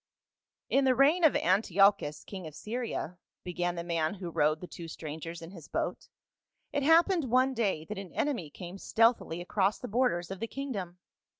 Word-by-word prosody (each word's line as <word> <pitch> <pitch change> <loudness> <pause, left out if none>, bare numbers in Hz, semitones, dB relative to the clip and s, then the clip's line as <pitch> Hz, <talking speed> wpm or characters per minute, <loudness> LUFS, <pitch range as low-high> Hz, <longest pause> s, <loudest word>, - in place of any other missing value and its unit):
" - - -37
TN 275 0 +4
the 260 -1 +4
reign 300 +7 +4
of 315 - +6
Antiochus, 190 -4 +3
king 190 -4 -7
of 155 - -10
Syria," 220 -6 -4 0.2
began 175 0 -2
I 170 - -3
the - - -12
man 165 +1 0
who 180 -3 -6
rowed 155 0 +2
the 180 - -7
two 170 -1 -9
strangers 160 +1 -7
in 165 - -9
his 170 -6 -11
boat, - - -3 0.3
" - - -51
it 285 - +1
happened 330 +2 +4
one 255 +2 +3
day 200 -10 0
that 210 +1 -5
an 195 -3 -8
enemy 245 - -1
came 180 +5 -9
stealthily 225 -8 +2
across 195 +3 +1
the 250 - -7
borders 210 -7 0
of 195 - -5
the 230 - -3
kingdom. 210 -11 -5
195 Hz, 195 wpm, -30 LUFS, 170-250 Hz, 0.3 s, of